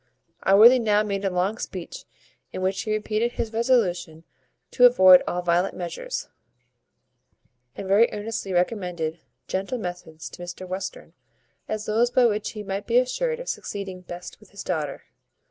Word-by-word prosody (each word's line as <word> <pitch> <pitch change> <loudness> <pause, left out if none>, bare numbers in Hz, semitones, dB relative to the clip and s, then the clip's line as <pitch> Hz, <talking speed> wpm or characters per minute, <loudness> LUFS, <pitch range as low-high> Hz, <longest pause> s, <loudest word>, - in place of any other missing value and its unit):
Allworthy 220 +6 +7
now 210 -2 +2
made 200 -1 -3
a 195 - +1
long 185 +4 -1
speech, 180 -3 -7 0.5
in 185 - -5
which 190 +1 0
he 215 - -4
repeated 215 +2 -1
his 225 -1 -4
resolution 185 -9 0 0.5
to 250 -1 +7
avoid 185 -7 +7
all 175 0 -2
violent 175 +2 +1
measures, 185 - -5 1.5
and 195 - -6
very 205 +5 +4
earnestly 210 -2 -4
recommended 175 -3 -1 0.3
gentle 195 +7 -2
methods 175 -5 -7
to - - -11
Mr 175 +1 -7
Western, 195 - -6 0.5
as 215 -1 -4
those 230 +3 +2
by 245 0 +4
which 210 -2 0
he 210 -2 -6
might 195 0 -4
be 235 - +3
assured 475 - 0
of - - -8
succeeding 195 -3 -5
best 175 0 -9
with 215 -2 -19
his 200 - -9
daughter. 150 -6 -3
200 Hz, 155 wpm, -24 LUFS, 180-225 Hz, 1.5 s, Allworthy